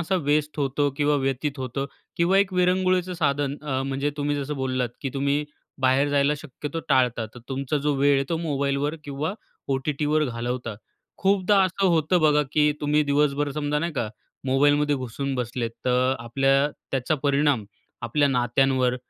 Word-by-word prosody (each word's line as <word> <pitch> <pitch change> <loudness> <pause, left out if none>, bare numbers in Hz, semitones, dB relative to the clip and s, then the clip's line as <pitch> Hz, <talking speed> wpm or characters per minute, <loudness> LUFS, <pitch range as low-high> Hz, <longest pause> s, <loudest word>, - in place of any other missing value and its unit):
असा 170 +3 -1
वेस्ट 150 +1 +1
होतो 145 +1 +1
किंवा 150 0 +2
व्यतीत 135 +2 -2
होतो. 130 +1 -3 0.3
किंवा 175 +3 +3
एक 195 -1 +2
विरंगुळ्याचे 185 0 +2
साधन 140 -3 0
अ, 135 -3 -2
म्हणजे 135 +2 -1
तुम्ही 145 0 -1
जसं 145 +1 -3
बोललात 130 -2 -1
की 135 - -3
तुम्ही 140 +2 0 0.4
बाहेर 130 +2 +3
जायला 145 0 +2
शक्यतो 150 +2 -6
टाळतात. 125 -3 +1
तुमचा 135 +2 -2
जो 145 - +2
वेळ 140 +1 +4
आहे, 135 0 +1
तो 165 - 0
मोबाईलवर 145 -1 -1
किंवा 145 +6 -3 0.3
ओ-टी-टीवर 150 +3 0
घालवता. 120 -2 -3 0.4
खूपदा 195 0 +3
असं 190 +1 +1
होतं 170 0 +2
बघा, 150 -1 +4
की 150 -1 +3
तुम्ही 150 +1 +2
दिवसभर 145 0 +1
समजा 150 0 -1
नाही 170 +2 -2
का, 120 -7 -2 0.4
मोबाईलमध्ये 145 +2 +3
घुसून 135 +2 -4
बसले. 120 -1 -2
तर 125 +3 0
आपल्या 135 +4 +2 0.2
त्याचा 135 +3 0
परिणाम 140 -4 +2 0.4
आपल्या 140 +5 +2
नात्यांवर 125 0 +2
140 Hz, 155 wpm, -24 LUFS, 130-150 Hz, 0.4 s, वेळ